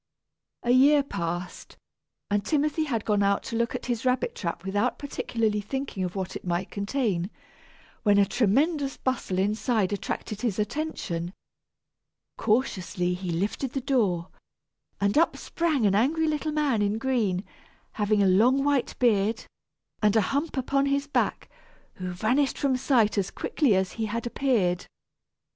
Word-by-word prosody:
A 240 - +2
year 280 +3 +6
passed, 175 -7 -5 0.5
and 205 0 +2
Timothy 305 +5 +1
had 230 -7 -2
gone 205 -2 +2
out 200 0 +2
to 230 - -5
look 235 0 0
at - - -5
his 240 -2 -2
rabbit 255 -1 +1
trap 170 0 -4
without 205 +6 0
particularly 230 -6 -1
thinking 265 -2 -4
of 180 +1 -4
what 190 -1 -4
it - - -6
might 175 +1 -2
contain, 200 -4 -1 0.7
when 205 -2 +4
a 200 - +6
tremendous 270 - +1
bustle 255 -8 -2
inside 210 +1 +1
attracted 205 +1 -4
his 225 -6 -1
attention. 210 - -3 1.1
Cautiously 190 -6 0
he 180 0 -5
lifted 200 +9 -2
the 270 - -1
door, 205 -10 0 0.7
and 200 +7 +3
up 335 - +2
sprang 315 -9 0
an 200 - +3
angry 300 +10 +2
little 310 0 -1
man 290 -7 +1
in 205 +1 +1
green, 225 -7 0 0.5
having 210 -1 +1
a - - +4
long 240 +9 +4
white 280 -3 0
beard, 220 -2 +2 0.6
and 210 0 +3
a 220 - +5
hump 290 +1 -1
upon 275 +2 +1
his 280 0 +1
back, 285 - -1 0.5
who 185 -1 -4
vanished 235 +10 +1
from 275 -2 +1
sight 235 -5 +2
as 195 - -1
quickly 270 -10 +1
as 190 0 0
he 225 -1 -3
had 230 +2 -3
appeared. 225 -9 0
220 Hz, 155 wpm, -26 LUFS, 195-270 Hz, 1.1 s, year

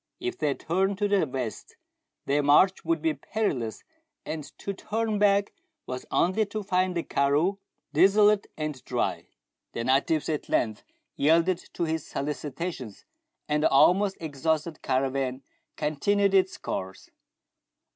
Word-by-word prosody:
If 365 0 -4
they 150 -3 +1
turned 190 +4 0
to 205 +1 +1
the 200 -5 +2
west, 130 -4 -5 0.5
their 145 +2 +2
march 150 +7 +4
would 330 0 0
be 320 -1 +2
perilous, 140 - -3 0.4
and 155 -1 -4
to 200 - -4
turn 215 +1 -2
back 200 0 +3 0.3
was 125 0 -6
only 185 +5 +2
to 215 +1 -4
find 185 -2 0
the 170 - -1
karroo 150 +8 +1 0.3
desolate 200 +5 +5
and 150 -5 -4
dry. 125 -1 -2 0.5
The 115 - -3
natives 135 +5 +2
at 155 -2 -3
length 110 -3 0 0.3
yielded 165 +4 +3
to 175 - -2
his 160 -2 -2
solicitations, 145 - -5 0.4
and 150 0 +1
the - - +4
almost 190 +8 +4
exhausted 160 +1 -2
caravan 130 0 -1 0.3
continued 195 +7 +1
its 190 -1 +3
course. 95 0 -6
160 Hz, 135 wpm, -27 LUFS, 140-200 Hz, 0.5 s, desolate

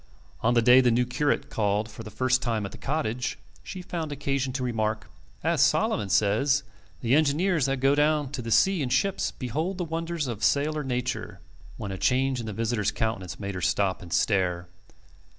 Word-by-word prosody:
On 120 +2 +2
the 120 - +4
day 125 +2 +7
the 125 - +3
new 120 +1 +2
curate 125 +4 -1
called 105 0 0
for 115 0 -10
the 110 - -8
first 130 +2 +1
time 115 -5 -1
at 100 - -6
the - - -10
cottage, 125 -5 -2 0.2
she 185 -2 -8
found 165 -4 -4
occasion 140 -2 -1
to 130 -1 -2
remark, 110 - -2 0.3
"As - - +2
Solomon 100 - +2
says: 110 +9 +2 0.4
'the 120 +1 +1
engineers 155 +1 +2
that 135 -1 -1
go 135 +1 +4
down 150 -1 +2
to 140 -4 -4
the 115 - -6
sea 190 - +3
in 130 - -1
ships 190 +10 +1
behold 155 - -3
the 180 - -2
wonders 165 -1 -3
of 115 -5 -5
sailor 150 +1 +1
nature';" 125 -1 -3 0.4
when 100 - -5
a 95 - -5
change 130 0 +1
in 115 - -5
the - - -3
visitor's 110 -1 0
countenance 100 -6 -3
made 100 -1 -4
her 90 - -5
stop 95 +2 +1
and 85 -3 -11
stare. 90 -3 +1
125 Hz, 195 wpm, -26 LUFS, 110-145 Hz, 0.4 s, day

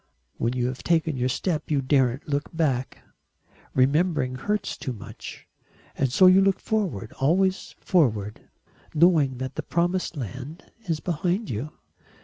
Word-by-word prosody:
When 115 +1 0
you 125 -1 -1
have 125 +1 -3
taken 160 -3 +1
your 125 0 0
step 155 +3 -2
you 145 -3 +2
daren't 130 -1 +1
look 145 -1 -1
back. 135 -6 -1 0.7
Remembering 140 0 +2
hurts 205 +10 -2
too 130 - -5
much. 105 - -10 0.5
And 135 -2 0
so 185 - +5
you 185 +1 +7
look 195 -1 +2
forward 185 - -2
always 185 +7 +1
forward, 110 - 0 0.5
knowing 150 -5 +4
that 130 +1 -4
the - - 0
promised 175 0 -1
land 130 - -7 0.2
is 160 -3 -1
behind 180 +5 -1
you." 125 +8 -4
150 Hz, 140 wpm, -25 LUFS, 130-175 Hz, 0.7 s, you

